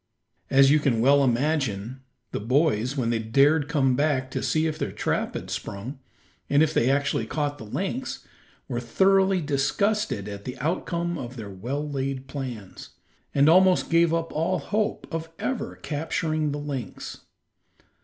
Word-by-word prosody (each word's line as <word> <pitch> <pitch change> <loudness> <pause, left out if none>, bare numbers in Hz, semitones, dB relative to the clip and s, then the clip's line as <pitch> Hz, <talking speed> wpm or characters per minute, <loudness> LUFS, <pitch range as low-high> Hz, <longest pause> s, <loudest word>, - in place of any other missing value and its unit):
As 135 0 +6
you 150 - +5
can 130 -6 +1
well 140 +4 +5
imagine, 130 -3 0 0.3
the - - -2
boys, 130 +1 +1
when 120 -3 +1
they 115 - +1
dared 140 +7 +3
come 135 -4 +2
back 135 -2 0
to - - -2
see 155 0 +1
if 155 -1 -2
their - - -2
trap - - -2
had - - -3
been - - -13
sprung, 120 +8 -5 0.5
and 145 +2 +5
if 155 0 +1
they 115 - +2
had 135 +1 +4
actually 140 -5 -1
caught 145 -1 -2
a - - -7
lynx, 190 - -4 0.4
were 120 -3 -2
thoroughly 190 +9 +3
disgusted 145 - 0
at 100 -1 -7
the 125 - -6
outcome 170 +2 -2
of 125 -1 -6
their 110 -5 -7
well 130 +10 -4
laid 135 -2 -3
plans, 125 -8 -7 0.4
and 140 +1 +5
almost 185 +2 +5
gave 165 0 +4
up 165 0 -1
all 170 +4 +1
hope 210 +7 -1
of 165 0 -3
ever 260 -3 -3
capturing 155 0 -2
the 145 - -3
lynx. 140 -8 -6
145 Hz, 165 wpm, -25 LUFS, 125-160 Hz, 0.5 s, As